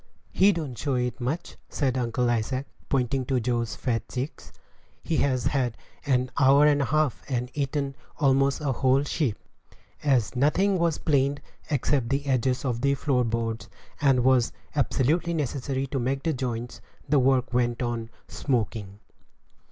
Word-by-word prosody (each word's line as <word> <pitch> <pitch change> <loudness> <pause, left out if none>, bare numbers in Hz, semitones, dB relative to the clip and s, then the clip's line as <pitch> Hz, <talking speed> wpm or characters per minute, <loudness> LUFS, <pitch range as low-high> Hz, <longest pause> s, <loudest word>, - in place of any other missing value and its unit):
"He 195 +2 +5
don't 155 -9 -4
show 140 +2 -1
it 125 0 -2
much," 140 +8 -3
said 135 -4 0
Uncle 125 0 0
Isaac, 120 +3 0 0.2
pointing 130 0 +1
to 130 0 +1
Joe's 120 -1 -1
fat 115 -3 -2
cheeks; 130 +4 -5 0.5
"he 160 - -1
has 130 -4 +1
had 130 -5 0 0.3
an 125 -2 +1
hour 140 +2 +6
and 145 -1 +4
a - - +1
half, 155 -3 +1
and 125 -1 -2
eaten 140 -1 -2 0.2
almost 135 0 +2
a 145 -2 0
whole 130 +2 +2
sheep." 140 -6 -1 0.6
As 130 -5 +1
nothing 180 +9 +2
was 170 -2 +1
planed 140 -1 +1 0.3
except 140 -4 +1
the 140 +1 0
edges 130 -1 0
of 120 -3 -1
the 140 +1 +2
floor 135 -3 +1
boards, 115 -1 -2 0.3
and 135 -4 +4
what 130 - +5
was 125 -2 +2 0.2
absolutely 150 +4 +1
necessary 135 -2 -2
to 135 0 -3
make 135 +3 -1
the 165 - +1
joints, 120 -2 -4 0.3
the 145 0 +4
work 130 -1 +2
went 120 0 +1
on 120 -1 -3 0.2
"smoking." 110 -6 -2
130 Hz, 160 wpm, -26 LUFS, 120-140 Hz, 0.6 s, hour